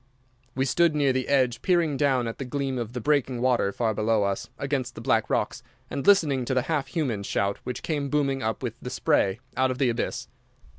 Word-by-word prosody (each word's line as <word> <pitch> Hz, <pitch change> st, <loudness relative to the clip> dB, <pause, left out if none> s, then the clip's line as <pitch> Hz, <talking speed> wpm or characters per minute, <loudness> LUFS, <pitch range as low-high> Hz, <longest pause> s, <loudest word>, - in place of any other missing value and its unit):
We 130 Hz, +1 st, +1 dB
stood 165 Hz, +3 st, +3 dB
near 140 Hz, -3 st, +3 dB
the 130 Hz, -1 st, -1 dB
edge 130 Hz, -4 st, +2 dB
peering 170 Hz, -5 st, +2 dB
down 135 Hz, -4 st, +2 dB
at 115 Hz, -, -6 dB
the -, -, -2 dB
gleam 135 Hz, 0 st, -2 dB
of 115 Hz, 0 st, -5 dB
the 125 Hz, -, -3 dB
breaking 130 Hz, -2 st, +1 dB
water 125 Hz, -5 st, +2 dB
far 110 Hz, +1 st, 0 dB
below 110 Hz, 0 st, +1 dB
us 100 Hz, -1 st, -2 dB
against 135 Hz, -2 st, -2 dB
the -, -, -7 dB
black 115 Hz, -3 st, +1 dB
rocks, -, -, -1 dB, 0.3 s
and 140 Hz, -, -3 dB
listening 155 Hz, -10 st, +4 dB
to 130 Hz, -, -1 dB
the 130 Hz, -, +2 dB
half 145 Hz, -3 st, -1 dB
human 130 Hz, -7 st, -2 dB
shout 100 Hz, 0 st, -1 dB
which 125 Hz, -, -5 dB
came 145 Hz, -3 st, -2 dB
booming 140 Hz, -2 st, 0 dB
up 110 Hz, +2 st, -2 dB
with 120 Hz, -3 st, -2 dB
the 125 Hz, -, -5 dB
spray 100 Hz, -4 st, +1 dB, 0.2 s
out 130 Hz, 0 st, +2 dB
of 130 Hz, -, -2 dB
the 130 Hz, -2 st, +2 dB
abyss. 115 Hz, -, -2 dB
130 Hz, 215 wpm, -26 LUFS, 120-140 Hz, 0.3 s, listening